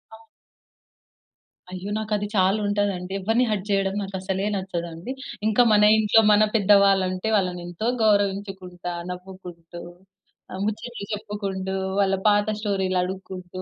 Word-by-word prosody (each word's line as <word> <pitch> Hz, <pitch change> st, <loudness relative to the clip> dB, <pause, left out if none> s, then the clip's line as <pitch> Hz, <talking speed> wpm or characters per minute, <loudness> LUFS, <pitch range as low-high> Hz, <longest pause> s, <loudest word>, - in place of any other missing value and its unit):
అవును. 225 Hz, 0 st, -18 dB, 1.4 s
అయ్యో! 185 Hz, +2 st, -6 dB
నాకు 215 Hz, 0 st, -6 dB
అది 205 Hz, 0 st, -3 dB
చాలా 190 Hz, +2 st, +3 dB
ఉంటదండి. 200 Hz, -3 st, -1 dB
ఎవరిని 225 Hz, +6 st, +1 dB
హర్ట్ 200 Hz, -2 st, -2 dB
చేయడం 195 Hz, -1 st, +1 dB
నాకు 195 Hz, 0 st, -7 dB
అసలే 190 Hz, +1 st, -2 dB
నచ్చదండి. 170 Hz, +1 st, -5 dB, 0.4 s
ఇంకా 220 Hz, +2 st, +4 dB
మన 210 Hz, 0 st, +5 dB, 0.2 s
ఇంట్లో 220 Hz, +1 st, +5 dB
మన 210 Hz, +1 st, +5 dB
పెద్దవాళ్ళుంటే, 195 Hz, -2 st, +3 dB
వాళ్ళని 180 Hz, -2 st, -1 dB
ఎంతో 175 Hz, +6 st, -4 dB, 0.2 s
గౌరవించుకుంటా, 195 Hz, -4 st, -1 dB, 0.2 s
నవ్వుకుంటూ, 180 Hz, -2 st, -10 dB, 0.7 s
ఆహ్, 190 Hz, -, -5 dB
ముచ్చట్లు 215 Hz, +1 st, -4 dB
చెప్పుకుంటూ, 200 Hz, -3 st, -4 dB, 0.3 s
వాళ్ళ 195 Hz, -1 st, +3 dB
పాత 205 Hz, 0 st, +3 dB
స్టోరీలు 190 Hz, -3 st, -1 dB
అడుక్కుంటూ, 185 Hz, 0 st, -6 dB
195 Hz, 125 wpm, -24 LUFS, 185-205 Hz, 1.4 s, మన